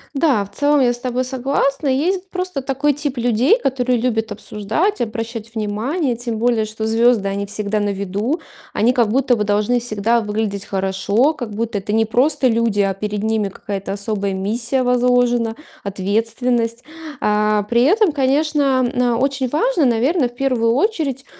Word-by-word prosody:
Да, 275 Hz, -8 st, +2 dB
в 195 Hz, -, -17 dB
целом 290 Hz, 0 st, +3 dB
я 245 Hz, -2 st, +3 dB
с 240 Hz, -, -9 dB
тобой 250 Hz, 0 st, -1 dB
согласна. 275 Hz, +2 st, -1 dB
Есть 360 Hz, +8 st, 0 dB
просто 365 Hz, -6 st, -3 dB
такой 275 Hz, +2 st, 0 dB
тип 285 Hz, -1 st, -4 dB
людей, 245 Hz, -, +3 dB
которые 255 Hz, -, 0 dB
любят 225 Hz, -2 st, -1 dB
обсуждать, 215 Hz, -, -2 dB
обращать 230 Hz, 0 st, -5 dB
внимание. 235 Hz, -, -1 dB
Тем 235 Hz, -1 st, -4 dB
более, 230 Hz, -1 st, +1 dB
что 215 Hz, +1 st, -5 dB
звезды- 225 Hz, -2 st, +3 dB
они 200 Hz, +1 st, -3 dB
всегда 210 Hz, +1 st, -2 dB
на 205 Hz, 0 st, 0 dB
виду. 200 Hz, -, -2 dB, 0.3 s
Они 240 Hz, +4 st, +2 dB
как 235 Hz, -4 st, +2 dB
будто 255 Hz, +1 st, +2 dB
бы 210 Hz, -, -1 dB
должны 210 Hz, +4 st, +1 dB
всегда 230 Hz, 0 st, 0 dB
выглядеть 210 Hz, -2 st, -3 dB
хорошо, 195 Hz, +8 st, +1 dB
как 245 Hz, -7 st, -6 dB
будто 225 Hz, -1 st, -2 dB
это 205 Hz, +2 st, -4 dB
не 225 Hz, 0 st, +3 dB
просто 255 Hz, +5 st, +2 dB
люди, 230 Hz, -3 st, +1 dB
а 195 Hz, -1 st, +1 dB
перед 210 Hz, +1 st, -4 dB
ними 220 Hz, -2 st, 0 dB
какая-то 195 Hz, 0 st, -5 dB
особая 200 Hz, -1 st, -2 dB
миссия 230 Hz, +7 st, -1 dB
возложена, 245 Hz, -2 st, +2 dB, 0.3 s
ответственность. 230 Hz, +4 st, -1 dB, 0.4 s
А, 210 Hz, 0 st, +2 dB
при 235 Hz, +3 st, +1 dB
этом, 390 Hz, -, +4 dB
конечно, 280 Hz, -1 st, +1 dB
на 245 Hz, -1 st, +1 dB
очень 265 Hz, 0 st, 0 dB
важно, 330 Hz, -, +1 dB
наверно, 255 Hz, +5 st, +2 dB
в 240 Hz, -, -20 dB
первую 245 Hz, -3 st, +1 dB
очередь, 295 Hz, -, -1 dB
235 Hz, 165 wpm, -19 LUFS, 210-270 Hz, 0.4 s, этом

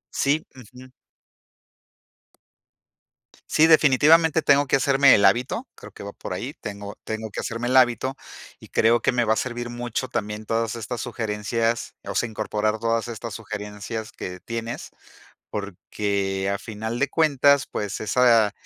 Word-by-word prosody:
Sí, 145 Hz, +3 st, +1 dB
ujú. 130 Hz, +1 st, -14 dB, 2.6 s
Sí, 160 Hz, +1 st, +5 dB
definitivamente 155 Hz, +2 st, +5 dB
tengo 145 Hz, 0 st, +4 dB
que -, -, +3 dB
hacerme 135 Hz, 0 st, +5 dB
el 100 Hz, -, +3 dB
hábito, 125 Hz, -, +1 dB
creo -, -, -12 dB
que -, -, -13 dB
va 100 Hz, -, -7 dB
por -, -, -7 dB
ahí, -, -, -5 dB
tengo 100 Hz, 0 st, -7 dB
tengo 110 Hz, 0 st, -5 dB
que -, -, -5 dB
hacerme 115 Hz, +1 st, -3 dB
el 130 Hz, -, 0 dB
hábito, 130 Hz, +1 st, +3 dB, 0.4 s
y -, -, -15 dB
creo 115 Hz, +1 st, +3 dB
que -, -, +2 dB
me 120 Hz, -1 st, +1 dB
va 110 Hz, -, +3 dB
a -, -, -1 dB
servir 120 Hz, +1 st, -3 dB
mucho 120 Hz, +1 st, -4 dB
también 105 Hz, -3 st, -4 dB
todas 115 Hz, 0 st, -1 dB
estas 115 Hz, +1 st, -5 dB
sugerencias, 115 Hz, 0 st, -2 dB
o -, -, -4 dB
sea, 120 Hz, -, 0 dB
incorporar 110 Hz, 0 st, -1 dB
todas 115 Hz, 0 st, 0 dB
estas 115 Hz, -1 st, -6 dB
sugerencias 105 Hz, 0 st, -6 dB
que 90 Hz, 0 st, -7 dB
tienes, 115 Hz, +4 st, -6 dB, 0.6 s
porque 100 Hz, -1 st, -3 dB
a -, -, -3 dB
final 110 Hz, +3 st, -5 dB
de 135 Hz, -, +1 dB
cuentas, 140 Hz, -2 st, +3 dB
pues 105 Hz, -1 st, -4 dB
esa, 115 Hz, -1 st, +4 dB
115 Hz, 150 wpm, -24 LUFS, 105-130 Hz, 2.6 s, Sí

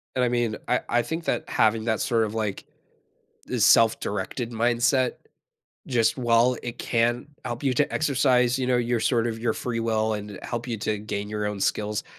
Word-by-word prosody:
And 125 Hz, -, +2 dB
I 120 Hz, -, +2 dB
mean, 120 Hz, -3 st, 0 dB
I -, -, +1 dB
I 120 Hz, -, +3 dB
think 160 Hz, +6 st, -5 dB
that -, -, -2 dB
having 110 Hz, 0 st, +2 dB
that 110 Hz, -2 st, 0 dB
sort 115 Hz, -2 st, +1 dB
of 105 Hz, -, -3 dB
like 105 Hz, -3 st, -3 dB, 0.8 s
the 125 Hz, -, -3 dB
self-directed 115 Hz, +1 st, +2 dB
mindset, 120 Hz, +3 st, +2 dB, 0.7 s
just 115 Hz, -2 st, +2 dB
while 120 Hz, 0 st, +3 dB
it 120 Hz, 0 st, -5 dB
can 120 Hz, +3 st, 0 dB, 0.2 s
help 120 Hz, +4 st, -4 dB
you 130 Hz, -2 st, +2 dB
to 145 Hz, -, +1 dB
exercise, 130 Hz, -4 st, +2 dB
you 125 Hz, -, -1 dB
know, 125 Hz, -1 st, +3 dB
your 120 Hz, 0 st, 0 dB
sort 120 Hz, 0 st, +1 dB
of 115 Hz, -1 st, -4 dB
your 115 Hz, -1 st, 0 dB
free 115 Hz, -2 st, -3 dB
will 110 Hz, -1 st, 0 dB
and 105 Hz, -2 st, -6 dB
help 120 Hz, 0 st, -4 dB
you 115 Hz, -2 st, -3 dB
to 110 Hz, 0 st, -1 dB
gain 105 Hz, -1 st, -4 dB
your 105 Hz, 0 st, -3 dB
own 105 Hz, -1 st, -3 dB
skills, 105 Hz, +1 st, -1 dB
115 Hz, 190 wpm, -25 LUFS, 110-125 Hz, 0.8 s, I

